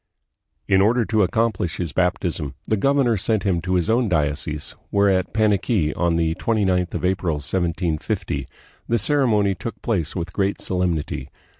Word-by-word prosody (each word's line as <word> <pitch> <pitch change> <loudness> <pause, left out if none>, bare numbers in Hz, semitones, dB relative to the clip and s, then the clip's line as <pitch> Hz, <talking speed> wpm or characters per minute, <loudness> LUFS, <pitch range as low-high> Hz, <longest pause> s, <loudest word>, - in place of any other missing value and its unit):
In 95 0 +4
order 115 +3 +3
to 110 0 +1
accomplish 100 -3 0
his 85 -6 -3
baptism, 90 -5 -1
the 110 - +1
governor 130 0 +2
sent 110 +2 0
him 90 -4 +1
to 90 +2 -1
his 90 -3 +1
own 115 0 +2
diocese, 75 -2 -1
where 100 0 +3
at 95 -1 0
Paniqui, 105 -5 +1
on 85 -1 +1
the 80 -1 +1
29th 95 -3 0
of - - -2
April, 90 -3 0
1750, 80 -2 -2 0.4
the 120 - +2
ceremony 110 -5 +2
took 95 +5 -7
place 90 -10 -1
with 90 -1 -4
great 100 0 0
solemnity. 85 -7 -2
95 Hz, 155 wpm, -22 LUFS, 85-110 Hz, 0.4 s, In